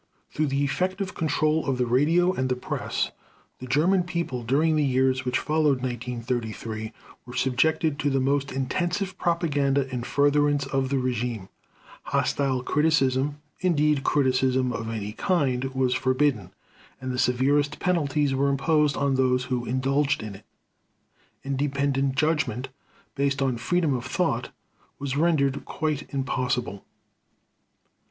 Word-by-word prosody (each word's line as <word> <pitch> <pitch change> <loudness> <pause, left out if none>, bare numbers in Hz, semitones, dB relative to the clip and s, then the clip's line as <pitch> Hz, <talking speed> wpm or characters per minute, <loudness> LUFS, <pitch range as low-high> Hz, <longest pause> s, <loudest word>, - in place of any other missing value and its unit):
Through 155 0 0
the 140 +1 0
effective 185 +7 -1
control 155 0 +1
of 135 -2 0
the 125 - +1
radio 160 +9 +3
and 130 -4 -1
the 125 - +1
press, 125 - -3 0.5
the 130 - -8
German 170 +8 +3
People, 170 -8 -3
during 145 +7 +2
the 150 - +2
years 130 -1 +1
which 125 0 +1
followed 150 -4 +1
1933, 115 -3 -4 0.4
were 125 - -9
subjected 140 +4 +1
to 145 - +1
the 135 -1 +1
most 140 +1 0
intensive 175 +9 -2
propaganda 145 -5 +1
in 125 - -2
furtherance 145 +2 +2
of 135 -1 -1
the 140 - +1
regime. 120 -5 -2 0.6
Hostile 130 -3 0
criticism, 145 -2 +1 0.2
indeed 150 -5 +2
criticism 130 -2 +2
of 115 0 -4
any 105 -2 -4
kind, 135 - 0
was 130 -1 0
forbidden, 130 -6 +1 0.5
and 130 0 -4
the 125 - -3
severest 140 +4 +2
penalties 150 -5 +1
were 140 +1 +2
imposed 150 +1 +2
on 140 -1 +1
those 130 -1 +2
who 125 -2 -2
indulged 135 +1 0
in 105 -2 -6
it. 95 - -13 1.0
Independent 140 0 0
judgment, 140 -5 0 0.4
based 140 -1 0
on 135 -2 +1
freedom 155 +6 0
of 125 -1 -3
thought, 130 -4 -1 0.5
was 140 -1 -3
rendered 145 -3 +2
quite 155 -2 -3
impossible. 125 -6 -2
135 Hz, 135 wpm, -25 LUFS, 125-150 Hz, 1.0 s, radio